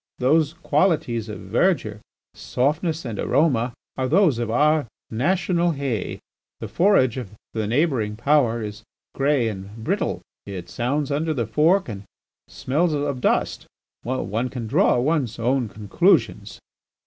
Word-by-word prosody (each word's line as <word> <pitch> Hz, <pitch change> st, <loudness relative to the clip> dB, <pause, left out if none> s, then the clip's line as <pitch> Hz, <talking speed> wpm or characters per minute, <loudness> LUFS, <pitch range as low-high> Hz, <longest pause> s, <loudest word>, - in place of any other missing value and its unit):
Those 150 Hz, +4 st, +2 dB
qualities 155 Hz, -, 0 dB
of 105 Hz, -, -7 dB
verdure, 110 Hz, -, 0 dB, 0.3 s
softness, 155 Hz, +4 st, -1 dB
and 115 Hz, -4 st, -5 dB
aroma, 125 Hz, -4 st, +1 dB, 0.2 s
are 130 Hz, -1 st, -1 dB
those 160 Hz, -, +3 dB
of 120 Hz, -2 st, -2 dB
our 150 Hz, +3 st, +2 dB, 0.2 s
national 175 Hz, +6 st, +1 dB
hay. 135 Hz, -7 st, -3 dB, 0.4 s
The -, -, -5 dB
forage 170 Hz, -, +3 dB
of 105 Hz, -5 st, -7 dB, 0.2 s
the 110 Hz, -2 st, -2 dB
neighbouring 120 Hz, -4 st, 0 dB
Power 120 Hz, -2 st, +2 dB
is 105 Hz, +1 st, -7 dB, 0.3 s
grey 135 Hz, -3 st, +1 dB
and 100 Hz, 0 st, -6 dB
brittle; -, -, -1 dB, 0.3 s
it 90 Hz, -3 st, -7 dB
sounds 140 Hz, +4 st, -1 dB
under 155 Hz, +2 st, 0 dB
the 120 Hz, -4 st, -1 dB
fork 160 Hz, -, +2 dB
and 100 Hz, -4 st, -6 dB, 0.5 s
smells 155 Hz, +5 st, 0 dB
of 145 Hz, -3 st, -2 dB
dust. -, -, 0 dB, 0.3 s
One 120 Hz, -1 st, -2 dB
can 125 Hz, -3 st, -5 dB
draw 110 Hz, -, +3 dB
one 140 Hz, +2 st, +1 dB
own 120 Hz, 0 st, 0 dB
conclusions." 105 Hz, -1 st, +1 dB
130 Hz, 135 wpm, -23 LUFS, 115-155 Hz, 0.5 s, those